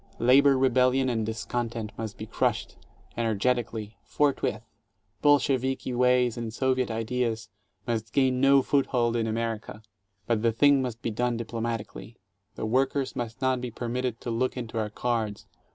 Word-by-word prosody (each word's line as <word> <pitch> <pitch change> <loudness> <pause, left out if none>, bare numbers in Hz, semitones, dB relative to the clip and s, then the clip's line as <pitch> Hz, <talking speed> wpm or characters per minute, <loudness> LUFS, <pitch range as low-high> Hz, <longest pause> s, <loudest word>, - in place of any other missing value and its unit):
Labor 135 +3 +5
rebellion 130 0 +3
and 115 -2 0
discontent 115 -1 -3
must 110 -2 -6
be 110 - -6
crushed, 110 - -1 0.4
energetically, 115 -1 -1
forthwith. 135 -6 0 0.6
Bolsheviki 135 -3 +2
ways 125 -1 +3
and 115 -1 -4
Soviet 130 +1 0
ideas 115 0 -2 0.4
must 115 -2 -2
gain 130 -2 +2
no 135 0 +5
foothold 125 -4 +1
in 115 -1 0
America. 110 -1 -3 0.4
But 115 -2 +1
the 115 0 +3
thing 140 +4 +4
must 120 -2 -5
be 115 - -1
done 120 +2 0
diplo 115 0 -5
matically; 115 0 -5 0.4
the - - -4
workers 135 +4 0
must 120 +1 -5
not 130 -1 +1
be 125 - -4
permitted 120 +1 -3
to 120 - -4
look 125 +3 -1
into 115 -2 -4
our 105 -1 -1
cards. 110 -2 -2
120 Hz, 150 wpm, -27 LUFS, 115-130 Hz, 0.6 s, Labor